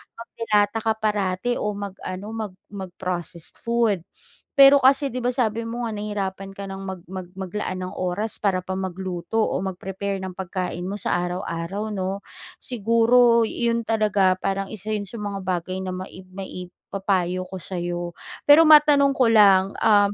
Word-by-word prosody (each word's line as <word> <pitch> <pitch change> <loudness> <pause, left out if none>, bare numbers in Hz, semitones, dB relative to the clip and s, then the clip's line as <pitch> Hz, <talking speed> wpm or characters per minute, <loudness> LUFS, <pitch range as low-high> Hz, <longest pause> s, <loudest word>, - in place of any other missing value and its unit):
magde 230 0 -8
lata 205 +1 +3
ka 225 - +2
parati 210 +1 0
o 210 - -1
mag-ano, 195 -1 -6
mag 215 -4 -4 0.2
mag-processed 180 -3 -5
food. 230 -6 +1 0.5
Pero 275 0 +8
kasi 275 +1 +4
di 255 - -3
ba, 245 - -1
sabi 230 -3 0
mo 240 +1 -4
nga 225 - -3
nahirapan 195 -2 -4
ka 200 - -7
ng 195 0 -6
mag 190 -2 -6
mag 185 -2 -6
maglaan 190 0 -3
ng 185 - -5
oras 185 +4 -2
para 190 -3 0
pa 190 - -6
magluto 185 0 -5
o - - 0
mag-prepare 195 +1 -4
ng 190 - -4
pagkain 180 -1 -4
mo 200 - -3
sa - - +1
araw-araw, 180 +3 -4
'no. 190 +1 -2 0.4
Siguro 230 +1 +4
iyon 235 0 0
talaga, 205 -4 +3
parang 195 0 -2
isa 215 0 -5
'yon 205 - -2
sa 230 +4 -6
mga 200 -2 -4
bagay 185 0 -2
na 185 - -3
maib 185 0 -9
maib 185 -1 -7 0.2
papayo 185 -2 0
ko 190 +1 -7
sa'yo. 175 -1 -3 0.3
Pero 295 +3 +9
matanong 295 -2 +7
ko 255 -3 +4
lang 195 -3 +5
um, 205 -2 +4
195 Hz, 165 wpm, -23 LUFS, 185-225 Hz, 0.5 s, Pero